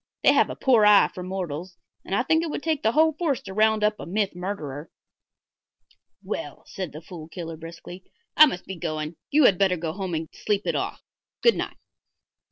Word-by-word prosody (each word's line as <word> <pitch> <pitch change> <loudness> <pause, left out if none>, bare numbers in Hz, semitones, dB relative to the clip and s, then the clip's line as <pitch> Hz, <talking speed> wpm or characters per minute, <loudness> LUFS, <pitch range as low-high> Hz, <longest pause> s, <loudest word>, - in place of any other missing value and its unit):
They - - +6
have - - +3
a - - -5
poor 245 -5 +4
eye 210 -1 +7
for 180 - -7
mortals, 180 -2 -5 0.3
and 195 - -2
I 245 - +2
think 320 +4 +2
it 330 - -3
would 295 - -4
take 315 -3 0
the 220 - +2
whole 315 +1 +4
force 300 -5 -1
to 195 - -8
round 215 +1 +3
up 210 0 +1
a - - -7
myth 200 +2 0
murderer." 165 -6 -5 1.3
"Well," - - -5
said 185 -4 -6
the 155 +3 -10
Fool 165 -2 -10
Killer, 165 0 -7
briskly, 170 +3 -10 0.3
"I 310 - +9
must 180 -9 -5
be 190 - -7
going. 155 -1 -4
You 300 +1 +4
had 195 -8 +5
better 190 -2 +3
go 160 -1 -3
home 190 -2 -4
and 160 0 -3
sleep 210 -1 -1
it - - 0
off. - - -3 0.4
Good 470 - +6
night." - - -4
190 Hz, 205 wpm, -25 LUFS, 170-220 Hz, 1.3 s, I